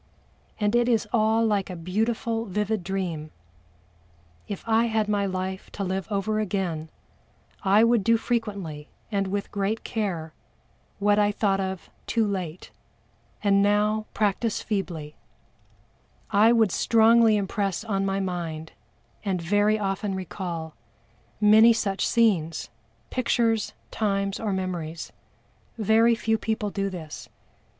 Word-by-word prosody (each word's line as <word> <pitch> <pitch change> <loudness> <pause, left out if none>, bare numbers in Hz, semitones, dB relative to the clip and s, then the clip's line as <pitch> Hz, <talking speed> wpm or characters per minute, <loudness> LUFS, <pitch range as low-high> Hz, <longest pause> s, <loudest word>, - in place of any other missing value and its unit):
And 210 +1 +1
it 240 0 +3
is 230 -3 +2
all 225 0 +3
like 205 -3 0
a 180 - -5
beautiful 225 +6 -1
vivid 210 0 -1
dream. 175 -5 -3 1.2
If 200 - -5
I 225 0 +3
had 220 -2 0
my 205 -1 +1
life 190 0 -4
to 200 - -3
live 190 0 -2
over 215 +2 0
again 180 -6 -2 0.7
I 205 +2 +5
would 230 -2 +3
do 230 +2 +4
frequently 200 -11 -3 0.2
and 200 -2 0
with 200 +1 -3
great 205 +2 -1
care, 175 -8 -3 0.6
what 205 +1 +3
I 205 0 +3
thought 200 -2 +1
of 190 -1 -4 0.2
too 230 -2 +2
late, 185 -4 -4 0.7
and 200 -1 +4
now 210 +1 +2
practice 210 +1 0
feebly 170 -8 -4 1.1
I 215 +2 +6
would 225 -5 +4
strongly 225 0 +5
impress 200 -1 -1
on 200 -4 -1
my 195 0 0
mind 170 -4 -4 0.5
and 195 -3 -1
very 205 +5 +2
often 195 -1 -2
recall, 175 -3 -5 0.7
many 220 +2 +7
such 195 -3 -1
scenes, 185 -9 +1 0.4
pictures, 230 -3 +1 0.2
times 200 -2 -1
or 215 -2 -2
memories. 175 -4 -4 0.7
Very 225 +2 +4
few 225 -1 0
people 215 -2 -2
do 195 0 -1
this. 165 -5 -8
200 Hz, 125 wpm, -26 LUFS, 190-220 Hz, 1.2 s, many